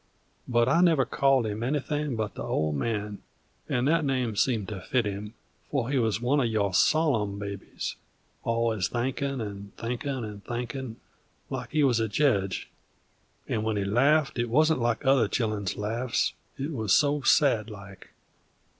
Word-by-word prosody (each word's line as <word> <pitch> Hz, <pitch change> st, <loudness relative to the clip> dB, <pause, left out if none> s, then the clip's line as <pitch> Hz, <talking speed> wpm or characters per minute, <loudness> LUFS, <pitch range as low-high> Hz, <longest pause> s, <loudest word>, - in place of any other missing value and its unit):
But 120 Hz, -1 st, +3 dB
I 165 Hz, +6 st, +4 dB
never 160 Hz, -7 st, +4 dB
called 135 Hz, -3 st, +2 dB
him 105 Hz, 0 st, -3 dB
anything 145 Hz, +1 st, -1 dB
but 110 Hz, -2 st, -2 dB
the -, -, -7 dB
Old 75 Hz, 0 st, 0 dB
Man, 105 Hz, +4 st, -2 dB, 0.5 s
and 125 Hz, +2 st, +1 dB
that 165 Hz, +1 st, +3 dB
name 130 Hz, -5 st, 0 dB
seemed 110 Hz, -2 st, +1 dB
to 100 Hz, -4 st, -6 dB
fit 120 Hz, +3 st, 0 dB
him, 105 Hz, +2 st, -5 dB, 0.3 s
for 135 Hz, -3 st, -1 dB
he 140 Hz, -, +2 dB
wuz 110 Hz, -3 st, +1 dB
one 130 Hz, +5 st, +2 dB
of 125 Hz, -, +2 dB
your 105 Hz, -4 st, 0 dB
sollum 110 Hz, -, +2 dB
babies, 100 Hz, -1 st, -5 dB, 0.5 s
alwuz 115 Hz, -4 st, 0 dB
thinkin' 135 Hz, +2 st, -2 dB
'nd 100 Hz, -1 st, -8 dB
thinkin' 125 Hz, +2 st, -3 dB
'nd 105 Hz, -2 st, -8 dB
thinkin', 120 Hz, 0 st, -4 dB, 0.6 s
like -, -, -4 dB
he 155 Hz, -1 st, +2 dB
wuz 125 Hz, -4 st, +3 dB
a 110 Hz, -, +1 dB
jedge, 105 Hz, -6 st, 0 dB, 0.8 s
and 110 Hz, -, -1 dB
when 110 Hz, -1 st, 0 dB
he 100 Hz, -, 0 dB
laffed 135 Hz, +6 st, +3 dB
it 120 Hz, 0 st, 0 dB
wuzn't 155 Hz, +4 st, +3 dB
like 120 Hz, +3 st, 0 dB
other 135 Hz, -1 st, +4 dB
children's 105 Hz, -6 st, -1 dB
laffs, 115 Hz, +4 st, -1 dB, 0.2 s
it 140 Hz, +3 st, -3 dB
wuz 110 Hz, -7 st, -3 dB
so 145 Hz, 0 st, +4 dB
sad 115 Hz, -6 st, +3 dB
like. 100 Hz, -2 st, -11 dB
120 Hz, 165 wpm, -27 LUFS, 105-135 Hz, 0.8 s, I